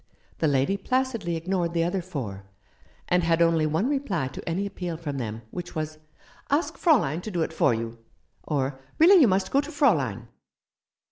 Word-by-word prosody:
The 160 - +2
lady 140 +7 +2
placidly 245 -5 -1
ignored 170 0 -1
the 165 -1 +2
other 180 +3 -1
four, 125 - -6 0.6
and 180 0 +2
had 165 0 +2
only 165 -2 +3
one 160 +9 0
reply 250 - -1
to - - -7
any 185 +5 -1
appeal 180 -4 -5
from 145 -4 -4
them, 115 -1 -5
which 175 -1 -7
was, 155 0 -4 0.5
"Ask 295 +5 +1
Fraulein 180 - +2
to 215 - -6
do 175 -5 0
it 160 - -4
for 140 -6 +3
you," 115 +1 -5 0.4
or 135 -2 -2 0.2
"Really 355 +3 +7
you 265 - +7
must 190 -1 +1
go 275 - +4
to 290 +2 -8
Fraulein." 135 - +1
170 Hz, 180 wpm, -26 LUFS, 145-200 Hz, 0.6 s, Really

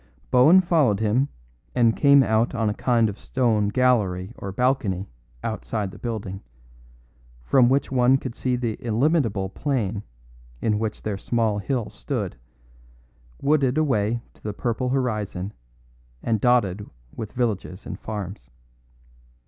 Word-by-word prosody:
Bohun 150 +9 +7
followed 150 - +2
him, 110 +6 +2 0.5
and 115 -2 +4
came 140 -1 +6
out 110 +1 +1
on 110 -2 +1
a - - -2
kind 115 0 +2
of 100 -1 -6
stone 115 -5 +1
gallery 105 -5 +1
or 100 - -6
balcony 105 -5 0 0.4
outside 95 - -3
the - - -13
building, 105 -5 -4 1.0
from 125 - +4
which 135 +1 +1
one 130 0 +4
could 130 -3 -6
see 125 -1 0
the 120 -3 -3
illimitable 115 - +1
plain 105 -2 -2 0.6
in 105 - +1
which 110 -1 -3
their 100 -2 -3
small 110 -2 0
hill 120 +2 -2
stood, - - -4 1.1
wooded 140 -2 +2
away 120 -6 +1
to - - -26
the 105 - -4
purple 120 +5 -2
horizon 105 -7 -2 0.7
and 110 -3 0
dotted 105 -5 +2 0.3
with 110 -2 -6
villages 105 -6 -2
and - - -6
farms. 100 - -6
115 Hz, 130 wpm, -24 LUFS, 105-125 Hz, 1.1 s, Bohun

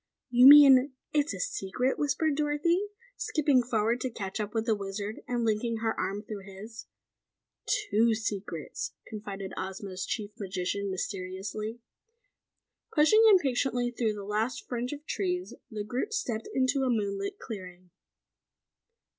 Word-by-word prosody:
"You 250 +1 +8
mean 275 -2 +9 0.2
it's 300 +1 +2
a - - -6
secret?" 250 - -1
whispered 295 +1 +1
Dorothy, 305 +6 +1 0.3
skipping 285 -4 +2
forward 230 0 0
to 260 - -1
catch 195 -4 -5
up 210 -1 -3
with 225 0 0
the 225 - +3
Wizard 200 +1 -5
and 240 -2 -1
linking 225 +1 0
her 225 0 0
arm 205 +2 -3
through 210 -2 -7
his. 210 +4 -10 0.8
"Two 230 - +2
secrets!" 200 -8 -4
confided 200 -3 -7
Ozma's 190 0 -5
Chief 210 -2 -3
Magician 195 0 -2
mysteriously. 195 +4 -4 1.1
Pushing 340 +9 +5
impatiently 255 - +2
through 230 -3 0
the 205 -1 -7
last 215 +5 -2
fringe 245 0 -3
of 295 +1 -7
trees, 360 0 -2 0.2
the 215 -3 -4
group 250 - -3
stepped 240 - -2
into 265 +1 +1
a 260 - +1
moonlit 200 -3 -1
clearing. 185 -4 -9
225 Hz, 135 wpm, -29 LUFS, 200-265 Hz, 1.1 s, mean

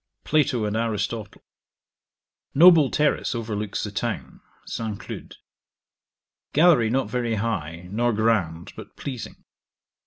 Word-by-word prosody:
Plato 145 -7 +1
and 105 0 -2
Aristotle 110 -1 -3 1.1
Noble 160 -2 +7
terrace 150 -3 +1
overlooks 105 -3 -3
the - - -4
town. - - -4 0.2
St. 110 -3 -4
Cloud. - - -9 1.2
Gallery 150 -8 +5
not 130 +3 0
very 120 -2 -1
high, 90 -6 -3
nor 120 +3 +1
grand, 100 -7 0
but - - -11
pleasing. 125 -5 -7
115 Hz, 105 wpm, -24 LUFS, 105-130 Hz, 1.2 s, Noble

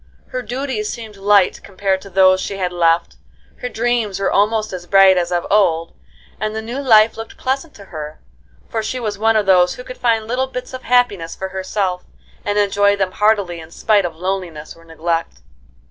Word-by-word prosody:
Her 255 - -3
duties 245 -2 -3
seemed 220 -3 -7
light 200 -1 +3
compared 190 -1 -2
to 200 - -11
those 185 0 +4
she 195 - -4
had 180 -2 -2
left, 170 -1 +1 0.4
her 250 - -5
dreams 230 -4 -1
were 195 - 0
almost 215 +1 +1
as 175 -1 -7
bright 195 0 +6
as 175 -1 0
of 175 -1 0
old, 165 -5 +2 0.5
and 215 +1 -2
the 220 - -2
new 240 +4 -5
life 225 -5 +5
looked 225 0 -8
pleasant 270 +4 -3
to 200 - -13
her, 155 -1 -7 0.5
for 225 - -2
she 255 +4 -3
was 210 -4 -4
one 225 +1 +3
of 215 -1 +2
those 180 -2 +4
who 250 - -9
could 255 - -10
find 225 -3 +1
little 255 +3 -1
bits 250 0 -7
of 255 - -6
happiness 230 -10 +1
for 190 - -5
herself 190 -1 -2 0.4
and 205 0 -1
enjoy 205 0 +3
them 195 -2 -1
heartily 200 -4 +1
in 160 0 -11
spite 205 +4 +2
of 170 -2 -4
loneliness 175 -3 -4
or 165 - -18
neglect. 165 0 -3
200 Hz, 195 wpm, -19 LUFS, 180-225 Hz, 0.5 s, bright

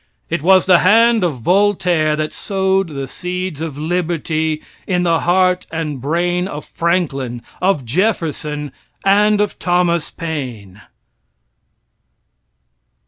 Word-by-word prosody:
It 170 -3 0
was 185 +3 +5
the 180 -2 +6
hand 225 +2 +4
of 150 -9 -1
Voltaire 180 - +2
that 155 0 -3
sowed 190 -1 0
the 140 -4 -5
seeds 180 +1 -5
of 160 -4 -5
liberty 160 -1 -1 0.2
in 180 -2 +1
the 165 -2 +2
heart 180 +1 +2
and 155 -5 -4
brain 175 +5 0
of 150 -5 -7
Franklin, 140 -9 -1 0.2
of 180 -8 +1
Jefferson, 150 - -1 0.3
and 205 +1 +4
of 210 - -1
Thomas 175 -2 +1
Paine. 125 - -6
170 Hz, 115 wpm, -18 LUFS, 150-185 Hz, 0.3 s, the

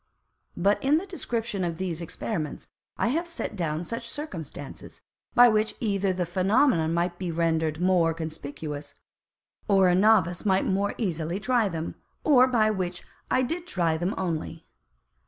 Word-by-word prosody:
But 200 +4 +2
in 285 +3 +4
the 355 - -3
Description 230 - -3
of 170 -2 -2
these 175 -2 -3
Experiments, 165 -1 -4 0.3
I - - +1
have 330 +7 -1
set 335 -9 -5
down 165 -3 -2
such 230 +5 -5
Circumstances, 165 - -7 0.4
by 245 0 +9
which 215 -1 +1
either 200 -5 +1
the 185 -1 -1
Phænomenon 185 - +2
might 175 +1 -1
be 180 -2 -3
render'd 160 -2 0
more 180 -2 +3
conspicuous, 150 -2 -6 0.7
or 195 -2 +5
a - - +4
Novice 185 -3 +3
might 190 -2 +2
more 200 +2 0
easily 170 -4 -2
try 235 -2 +2
them, 165 -2 -4 0.3
or 260 -4 +6
by 220 -4 +3
which 180 -3 -3 0.3
I 255 - +2
did 335 +7 -3
try 170 - +1
them 175 +4 -1
only. 165 -2 -3
185 Hz, 155 wpm, -26 LUFS, 165-225 Hz, 0.7 s, by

